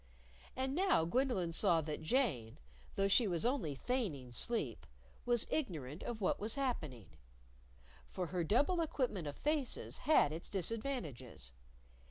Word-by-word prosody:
And 265 +1 -1
now 365 - +3
Gwendolyn 205 -4 +1
saw 165 0 +4
that 155 0 -4
Jane, 155 - 0 0.4
though 195 - +2
she 215 +3 +5
was 175 -1 0
only 240 - 0
feigning 160 - -2
sleep, 125 - -2 0.4
was 240 -2 +4
ignorant 160 - -2
of 235 -2 -4
what 185 - +1
was 215 +2 -1
happening. 160 - -2 1.0
For 185 - -3
her 175 +1 -1
double 285 - +3
equipment 250 - -1
of 145 - -5
faces 295 -4 -1
had 255 - +4
its 165 - -6
disadvantages. 170 - -4
195 Hz, 135 wpm, -36 LUFS, -, 1.0 s, she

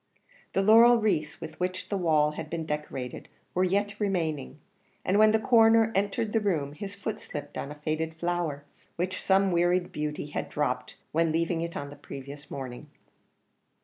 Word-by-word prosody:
The 195 - +2
laurel 230 +4 +8
wreaths 180 -9 0
with 160 - -8
which 185 +1 -3
the 205 - -1
walls 155 -5 +3
had 155 0 -6
been 165 -1 -3
decorated 150 -5 -5 0.2
were 185 - +2
yet 200 +2 0
remaining, 160 -9 -1 0.5
and 195 +3 +3
when 215 0 +7
the 220 - +4
Coroner 225 -1 +5
entered 205 +2 0
the 225 - +4
room 160 -9 -1
his 195 +6 -7
foot 215 +2 -4
slipped 145 -1 -7
on 140 - -4
a - - -7
faded 155 +2 -2
flower, 170 -4 -2 0.3
which 185 +2 -2
some 195 0 +3
wearied 175 +1 +2
beauty 150 0 -3
had 150 - -4
dropped 125 -4 -2 0.2
when 165 0 +2
leaving 165 +1 0
it 170 0 -4
on 140 0 -5
the - - -9
previous 140 +1 -9
morning. 130 -3 -7
170 Hz, 175 wpm, -28 LUFS, 150-200 Hz, 0.5 s, laurel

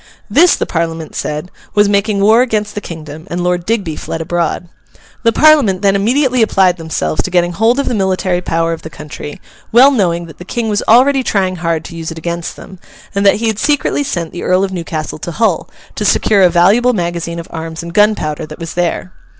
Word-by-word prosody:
This, 345 +4 +5
the - - -2
Parliament 165 -2 -3
said, 150 +4 -4 0.2
was 205 0 +4
making 200 0 +1
war 220 +4 +5
against 215 -4 -1
the 205 - -5
kingdom, 160 -3 -9
and 175 +1 -3
Lord 180 -1 -1
Digby 200 -8 -1
fled 165 - -5
abroad. 175 +1 -2 0.5
The 230 - +3
Parliament 260 -11 +4
then 195 -1 +3
immediately 250 +5 +2
applied 190 -4 +3
themselves 160 - -2
to - - -4
getting 175 -1 +1
hold 225 +7 +2
of 280 - -1
the - - 0
military 185 -3 0
power 165 -1 0
of 165 - -7
the 160 - -8
country, 150 -1 -9 0.3
well 255 +5 +7
knowing 175 -9 0
that 160 - -14
the - - -8
King 225 +4 -3
was 205 -1 0
already 265 +4 +5
trying 190 -6 0
hard 165 -2 -2
to 170 - -9
use 165 -1 -5
it 165 - -7
against 170 +1 -4
them, 190 - -12 0.3
and 200 0 0
that - - +5
he 230 - -3
had 220 -2 -1
secretly 290 +1 +1
sent 175 - -3
the 175 - -7
Earl 185 +1 +2
of 195 - -2
Newcastle 165 -3 -4
to 170 - -6
Hull, 215 -5 0 0.2
to - - -4
secure 205 0 +3
a 180 - +6
valuable 200 +9 +4
magazine 170 -3 -3
of 170 - -6
arms 165 0 -6
and 170 0 -8
gunpowder 170 -7 +1
that 155 - -10
was 165 -1 -6
there. 175 +1 -2
180 Hz, 215 wpm, -15 LUFS, 165-215 Hz, 0.5 s, well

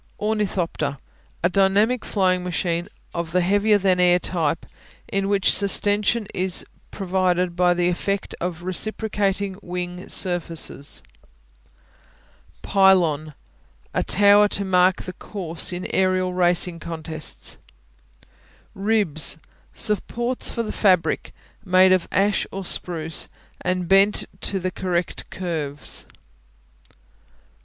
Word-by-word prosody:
Ornithopter 205 -9 -1 0.5
A 175 - +4
dynamic 200 +6 +2
flying 185 -3 +1
machine 175 -1 -2 0.2
of 170 -1 -4
the 180 - +3
heavier 205 +3 +3
than 190 -2 +2
air 180 0 +5
type, 165 -3 -1 0.4
in 195 0 -1
which 200 -1 +3
sustension 205 +2 +3
is 185 0 0 0.2
provided 180 -2 0
by 180 0 +3
the 175 0 +1
effect 195 +3 -2
of 175 -1 -4
reciprocating 200 0 -2
wing 180 0 -6
surfaces. 165 -5 -1 1.6
Pylon 170 -7 +3 0.6
A - - +1
tower 205 +1 +5
to 200 -1 -2
mark 185 0 +3
the 185 - -7
course 180 -5 -3
in 180 0 -5
aerial 185 -1 +1
racing 175 -1 +1
contests. 160 -2 -4 1.1
Ribs 195 -8 +1 0.3
Supports 235 +3 0
for 235 - -2
the 215 - -4
fabric, 185 -5 +1 0.3
made 185 0 +5
of 185 -2 +2
ash 200 +1 +1
or 195 0 -6
spruce 165 -3 0 0.3
and 180 -1 -1
bent 195 +2 +4 0.2
to 195 - 0
the 185 0 -2
correct 180 -2 -3
curves. 155 -6 -4
185 Hz, 110 wpm, -22 LUFS, 175-200 Hz, 1.6 s, air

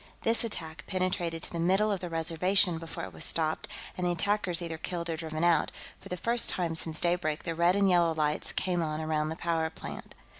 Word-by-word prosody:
This 225 +1 +5
attack 160 -9 -3
penetrated 180 -3 -1
to - - +1
the 170 - -3
middle 190 +5 +3
of 200 - -1
the 180 - -5
Reservation 165 +2 +2
before 165 0 -7
it 95 - -7
was 80 - -8
stopped 160 -1 -1 0.3
and 180 - -4
the 175 - +2
attackers 185 0 0
either 165 -2 -4
killed 170 0 -3
or - - -1
driven 160 0 -4
out; 175 -1 +3 0.3
for - - -12
the 180 - -3
first 235 +6 +3
time 170 -3 0
since 160 -1 +1
daybreak, 170 -3 0
the 165 - -2
red 170 +2 +3
and 200 -1 +3
yellow 170 -3 +3
lights 150 -1 +1
came 180 -2 0
on 155 -1 -2
around 155 -1 -1
the 160 - -4
power 165 -1 -1
plant. - - -9
170 Hz, 220 wpm, -29 LUFS, 160-180 Hz, 0.3 s, This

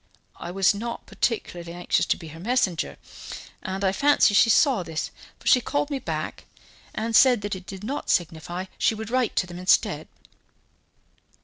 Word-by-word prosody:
I 170 - -7
was 195 +3 +3
not 235 +3 -5
particularly 175 -7 -2
anxious 175 0 0
to - - +1
be 165 - -10
her 160 +2 -11
messenger, 205 -4 0 0.6
and 190 0 -4
I 190 - +3
fancy 285 -1 +4
she 205 - +5
saw 255 -1 +4
this, 160 -2 -4 0.3
for - - -21
she 250 - +5
called 290 +2 -1
me 275 - -1
back - - -4 0.5
and 225 +1 -1
said 250 -4 +6
that 205 0 -3
it 185 0 -10
did 195 0 -8
not 270 +7 -4
signify, 175 +2 -1
she 225 - +2
would 220 +1 -7
write 255 -2 +1
to - - +2
them 175 0 -9
instead." 185 +1 +2
200 Hz, 175 wpm, -25 LUFS, 175-240 Hz, 0.6 s, said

